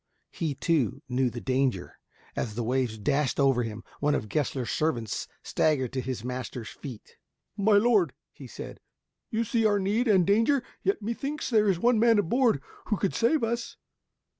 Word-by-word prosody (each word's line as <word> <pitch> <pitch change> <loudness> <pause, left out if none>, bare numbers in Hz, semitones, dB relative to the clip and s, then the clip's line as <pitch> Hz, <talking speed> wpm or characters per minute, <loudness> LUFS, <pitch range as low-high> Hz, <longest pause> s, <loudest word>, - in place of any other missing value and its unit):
He, 160 -5 -2
too, 135 -5 0
knew 125 0 +1
the 120 +1 -6
danger. 130 -8 -1 0.4
As 105 -3 -3
the 120 - -2
waves 125 -1 0
dashed 140 +7 0
over 135 -3 +4
him, 110 -1 -5 0.2
one 145 0 +2
of 105 - -3
Gessler's 130 0 -1
servants 120 -9 -1 0.2
staggered 135 -6 +1
to 130 - -1
his 125 -3 -4
master's 125 -2 -5
feet. 125 -7 -10 0.4
"My 205 0 +4
lord," 205 - +3 0.2
he 135 - -11
said, - - -9 0.5
"you 225 +1 0
see 230 +1 0
our 210 -2 +4
need 205 +6 +1
and 190 -5 +5
danger, 230 - +3 0.2
yet 390 - 0
methinks 275 +7 -3
there 215 -2 +4
is 185 - +2
one 235 +4 +3
man 230 -1 +5
on 170 - -1
board 240 - +2 0.2
who 210 - +1
could 195 - 0
save 235 +5 +2
us." 235 +1 -2
155 Hz, 175 wpm, -28 LUFS, -, 0.5 s, and